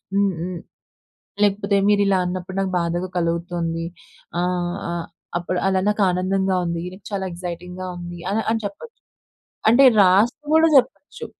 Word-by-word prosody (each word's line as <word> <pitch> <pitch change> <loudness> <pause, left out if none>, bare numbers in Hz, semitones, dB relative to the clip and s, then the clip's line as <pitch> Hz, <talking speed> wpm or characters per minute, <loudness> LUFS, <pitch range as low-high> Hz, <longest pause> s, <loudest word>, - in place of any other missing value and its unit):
హ్మ్, 200 -1 +2
హ్మ్. 180 0 -4 0.8
లేకపోతే 200 0 +2
మీరు 205 -1 +4
ఇలా 195 -1 +3
అన్నప్పుడు 185 +1 -4
నాకు 190 -1 -1
బాధగా 175 +2 -1
కలుగుతుంది. 170 -1 -2 0.6
ఆహ్, 180 -1 -1
ఆహ్, 170 -1 -4 0.3
అప్పుడు 180 +1 -2
అలా 190 -1 +2
నాకు 210 0 0
ఆనందంగా 190 +1 0
ఉంది. 170 0 -2 0.3
చాలా 195 -1 -2
ఎక్సైటింగ్‌గా 180 +1 -6
ఉంది 175 0 -8
అని, 220 +2 0
అని 225 0 0
చెప్పొచ్చు. 460 - -8 0.7
అంటే 255 +4 +6 0.2
రాస్తూ 200 +10 +3
కూడా 325 0 +6
చెప్పొచ్చు. 265 +3 0
185 Hz, 135 wpm, -22 LUFS, 175-200 Hz, 0.8 s, అంటే